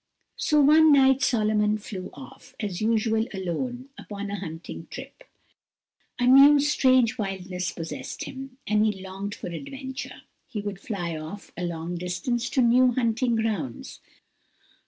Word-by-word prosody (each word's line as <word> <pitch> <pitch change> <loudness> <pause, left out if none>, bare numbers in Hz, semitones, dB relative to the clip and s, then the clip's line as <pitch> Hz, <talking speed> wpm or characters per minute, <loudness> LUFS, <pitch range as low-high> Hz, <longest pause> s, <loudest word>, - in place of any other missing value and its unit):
So 300 -1 +3
one 310 +2 +6
night 270 -2 +5
Solomon 215 -4 +2
flew 195 -3 -7
off, 135 -3 -13
as 205 -4 -4
usual, 225 0 +1
alone, 245 +8 -4
upon 205 -1 -6
a 205 - -3
hunting 165 -2 -8
trip; - - -10 0.9
a 245 - +1
new, 275 +3 +8
strange 255 -4 +3
wildness 190 -2 -3
possessed 165 -1 -6
him, 265 -1 -8
and 210 0 +2
he 210 -3 0
longed 195 +2 -6
for - - -7
adventures. 265 +7 -7 0.2
He 215 - -5
would 205 -2 -5
fly 175 -7 -4
off 155 +6 -8
a 180 - -5
long 170 +1 -4
distance 180 +8 -2
to 260 - +2
new 245 +1 +5
hunting 235 0 +1
grounds. 205 - -3
215 Hz, 140 wpm, -26 LUFS, 185-255 Hz, 0.9 s, new